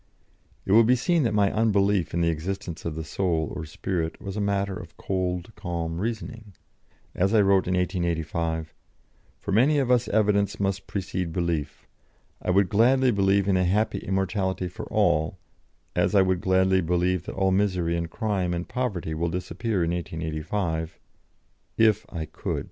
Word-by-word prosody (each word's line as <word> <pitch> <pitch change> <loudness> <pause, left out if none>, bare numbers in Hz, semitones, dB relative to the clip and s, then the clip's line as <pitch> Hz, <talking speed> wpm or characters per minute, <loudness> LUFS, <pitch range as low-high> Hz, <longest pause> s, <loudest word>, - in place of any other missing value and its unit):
" - - -36
It - - -2
will 115 +3 +7
be 125 +3 +4
seen 165 +7 +1
that 115 - +1
my 100 -2 +3
unbelief 100 -5 +2
in 85 - -1
the 85 - +3
existence 85 +1 -4
of 80 -2 -3
the 80 - -4
Soul 80 -2 -1
or 85 -3 -5
Spirit 80 +1 -3
was 100 0 -6
a 105 - -1
matter 100 -1 0
of - - -10
cold, 90 0 -2
calm 85 -1 -4
reasoning. 110 -1 -5 0.6
As 95 +4 +1
I 105 - +6
wrote 95 -2 +3
in 90 - +1
1885: 85 -3 -1 0.6
"For 100 - -6
many 130 +9 +4
of 130 -3 +1
us 125 -1 +3
evidence 100 -1 +1
must 95 -1 -1
precede 90 -3 -3
belief. 85 -4 -2 0.6
I - - -4
would 95 +1 +4
gladly 125 +5 +4
believe 100 -1 +2
in 95 -2 +3
a 90 - +2
happy 105 +3 +1
immortality 95 -1 -1
for - - -8
all, 80 +4 +2 0.6
as - - +2
I 95 - +6
would 95 -1 0
gladly 95 0 +3
believe 90 0 0
that - - -5
all 95 0 +2
misery 90 -4 +1
and 85 -1 -2
crime 95 -2 -1
and 85 +1 -4
poverty 100 -11 -2
will 85 +2 -1
disappear 90 +3 -2
in 85 - 0
1885 80 0 -3 0.8
if 110 -2 +3
I 80 -4 -4
could. - - -4
95 Hz, 170 wpm, -26 LUFS, 85-100 Hz, 0.8 s, will